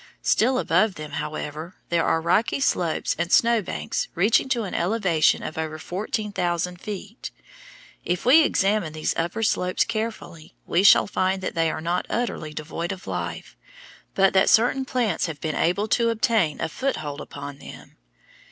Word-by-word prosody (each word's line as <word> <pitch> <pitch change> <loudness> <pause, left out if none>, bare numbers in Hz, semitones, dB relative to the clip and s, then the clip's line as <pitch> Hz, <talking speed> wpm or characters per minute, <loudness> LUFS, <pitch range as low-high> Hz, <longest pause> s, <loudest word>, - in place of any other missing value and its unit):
Still 255 +3 +3
above 190 -2 +2
them, 150 -1 -8
however, 155 +3 -5
there 170 -1 +2
are 160 - +1
rocky 190 +10 +1
slopes 175 - 0
and 170 +1 -1
snow 235 -3 +4
banks 185 - -3
reaching 205 +8 +3
to 240 -3 0
an 195 - -6
elevation 180 -5 +2
of 160 - -5
over 155 -1 -3
fourteen 210 +5 -4
thousand 180 -1 -2
feet. 210 +2 -7 0.7
If 175 0 -2
we 280 +6 +7
examine 195 - +1
these 155 0 -1
upper 175 +7 -2
slopes 180 -4 +1
carefully 220 -8 -5
we 175 - +2
shall 200 - +7
find 190 -1 -1
that - - -3
they 165 -1 +1
are 155 - -4
not 175 +2 -1
utterly 230 -10 -2
devoid 160 +3 -5
of 190 -1 -8
life, - - -5 0.6
but 195 0 +4
that 190 0 +4
certain 245 +4 +3
plants 235 -10 0
have 155 -3 -6
been 155 -1 -3
able 190 +5 +1
to 235 +1 +2
obtain 220 - +1
a 165 - -1
foothold 155 - -3
upon 140 -1 -8
them. - - -12
185 Hz, 165 wpm, -24 LUFS, 165-220 Hz, 0.7 s, we